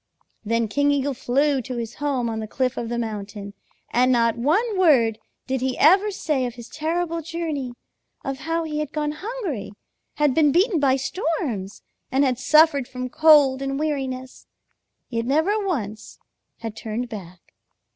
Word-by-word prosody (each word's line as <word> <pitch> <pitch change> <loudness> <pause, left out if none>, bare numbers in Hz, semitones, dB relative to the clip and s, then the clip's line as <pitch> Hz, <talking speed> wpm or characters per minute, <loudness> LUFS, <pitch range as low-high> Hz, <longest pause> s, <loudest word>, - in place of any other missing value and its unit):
Then 230 +1 0
King 285 +7 +1
Eagle 285 -1 +1
flew 270 +2 +1
to 250 +1 -6
his 230 0 -4
home 270 -5 0
on 225 -1 -3
the 215 - -4
cliff 255 +3 -1
of 230 - -4
the 240 - -2
mountain, 205 -3 -5 0.4
and 250 +2 +4
not 230 -2 +3
one 370 - +1
word 255 - +4 0.3
did 265 -1 -2
he 260 0 -1
ever 385 +7 +5
say 300 -10 -1
of 240 - -8
his 235 -1 -10
terrible 330 +2 -2
journey, 315 -6 -4 0.5
of 270 -1 -3
how 330 0 -1
he 305 -1 -3
had 300 -1 -4
gone 300 -1 -1
hungry, 355 - -5 0.4
had 295 -3 +2
been 300 -1 +4
beaten 360 - +3
by 270 -2 +3
storms, 275 - -3 0.3
and 270 +2 +3
had 255 -3 +1
suffered 285 -1 +4
from 255 0 -5
cold 290 -2 +5
and 275 0 -2
weariness, 265 -4 -3 0.6
yet 230 -2 -2
never 350 +10 +2
once 220 - -4 0.4
had 225 -2 -5
turned 225 +2 -4
back. 185 -6 -10
270 Hz, 165 wpm, -23 LUFS, 235-310 Hz, 0.6 s, ever